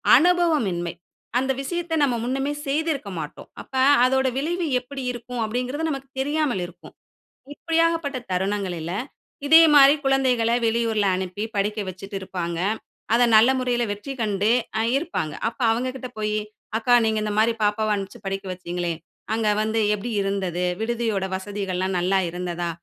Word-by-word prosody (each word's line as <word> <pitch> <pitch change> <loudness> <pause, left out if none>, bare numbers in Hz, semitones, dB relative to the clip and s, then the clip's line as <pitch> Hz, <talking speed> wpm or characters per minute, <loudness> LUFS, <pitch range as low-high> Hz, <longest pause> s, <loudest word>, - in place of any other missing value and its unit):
அனுபவமின்மை, 290 - +2 0.4
அந்த 265 +1 +1
விஷயத்த 340 +3 -2
நம்ப 260 -4 +2
முன்னமே 270 +4 -1
செய்திருக்க 285 -5 -1
மாட்டோம். 150 -2 -8
அப்ப - - -17 0.3
அதனுடைய 260 0 +2
விளைவு 340 +5 -1
எப்படி 270 +2 -8
இருக்கும். 245 0 -6
அப்டீங்குறது 255 +8 -2
நமக்கு 270 -2 -5
தெரியாமல் 290 -6 0
இருக்கும். 175 0 -13 0.6
இப்படியாகப்பட்ட 330 -4 0
தருணங்களில 185 -3 -2 0.5
இதே 320 +3 +8
மாதிரி 280 0 +8
குழந்தைகள்ல 260 -4 +2
வெளியூரில 225 -2 +1
அனுப்பி 185 +2 -4
படிக்க 210 +2 0
வச்சிட்டு 190 +2 -7
இருப்பாங்க. 170 -3 -4 0.5
அத 240 +1 +5
நல்ல 220 +4 +7
முறையில 245 -1 0
வெற்றி 205 +7 -5
கண்டு 210 0 +1 0.5
இருப்பாங்க. 280 - -3
அப்போ 235 +2 -3
அவங்ககிட்ட 255 +2 -2
போயி, 210 0 -1 0.4
"அக்கா 235 +2 +2
நீங்க 220 -1 +1
இந்த 210 -1 -2
மாதிரி 225 +2 +4
பாப்பாவ 210 +1 +1
அனுப்பிச்சி 195 -1 -6
படிக்க 195 0 -3
வச்சிங்களே, 175 -1 -3 0.4
அங்கே 220 -1 +1
வந்து 220 +1 0 0.2
எப்படி 220 +4 -5
இருந்தது? 190 -3 -1 0.2
விடுதியோட 225 -4 -1
வசதிகள்ல்லாம் 190 -1 -3
நல்லா 190 +2 +2
இருந்ததா? 175 0 -3
225 Hz, 135 wpm, -23 LUFS, 195-270 Hz, 0.6 s, இதே